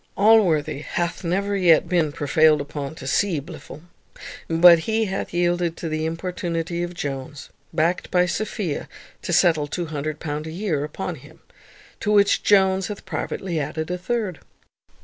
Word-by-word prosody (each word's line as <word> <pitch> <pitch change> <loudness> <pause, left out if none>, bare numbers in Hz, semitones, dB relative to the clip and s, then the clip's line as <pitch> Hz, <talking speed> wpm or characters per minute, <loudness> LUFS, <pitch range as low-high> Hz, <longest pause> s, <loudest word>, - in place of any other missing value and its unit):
Allworthy 175 -9 +4
hath 170 +4 -3
never 200 +4 -1
yet 175 -4 +4
been 170 -4 +1
prevailed 150 +2 +3
upon 145 +1 -5
to 135 - -10
see 165 +5 +1
Blifil, 155 0 -11 0.6
but 170 +1 +7
he 220 +6 0
hath 195 -1 -4
yielded 175 -1 0
to 165 - -4
the 155 0 -1
importunity 170 0 -3
of 175 0 -4
Jones, 140 -2 -6 0.2
backed 165 +2 0
by 180 -1 +3
Sophia, 180 -3 -3 0.3
to - - -4
settle 160 -4 +3
£200 155 -1 -4
a - - -6
year 170 -5 -2
upon 150 - -4
him; - - -16 0.6
to 210 - -1
which 200 -1 +4
Jones 190 -2 +3
hath 210 -2 -7
privately 175 -4 -3
added 155 +3 -4
a 180 - -1
third. 205 -3 -2
170 Hz, 150 wpm, -23 LUFS, 155-185 Hz, 0.6 s, but